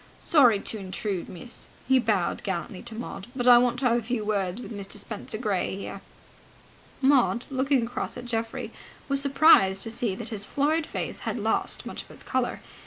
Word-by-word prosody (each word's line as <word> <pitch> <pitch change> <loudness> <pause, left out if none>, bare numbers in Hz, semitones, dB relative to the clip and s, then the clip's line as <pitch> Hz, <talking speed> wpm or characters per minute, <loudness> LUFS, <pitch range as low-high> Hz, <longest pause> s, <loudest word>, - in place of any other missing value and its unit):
"Sorry 250 -9 +6
to 220 - -3
intrude, 190 -1 -4
miss." 235 +7 -7 0.2
He 265 0 +5
bowed 210 -7 0
gallantly 190 +1 -4
to 235 -2 -7
Maud, 215 -4 -6
"but 250 -1 -1
I 245 -1 +9
want 245 0 +2
to - - 0
have 235 0 +3
a - - -6
few 225 -1 -2
words 200 -1 -1
with 245 - -8
Mr. 200 -1 -6
Spenser 215 +1 -4
Gray 205 -5 -1
here." 195 - -7 1.0
Maud, 260 -3 +3
looking 265 -1 +2
across 245 - -4
at 245 - -7
Geoffrey, 230 -1 -3 0.4
was 275 -1 +3
surprised 275 -9 +5
to 225 - -2
see 225 -4 -1
that - - -6
his 210 -3 -3
florid 300 +7 0
face - - -4
had - - -3
lost - - -1
much - - -5
of - - -17
its - - -11
colour. 255 -1 -1
235 Hz, 190 wpm, -26 LUFS, 205-255 Hz, 1.0 s, I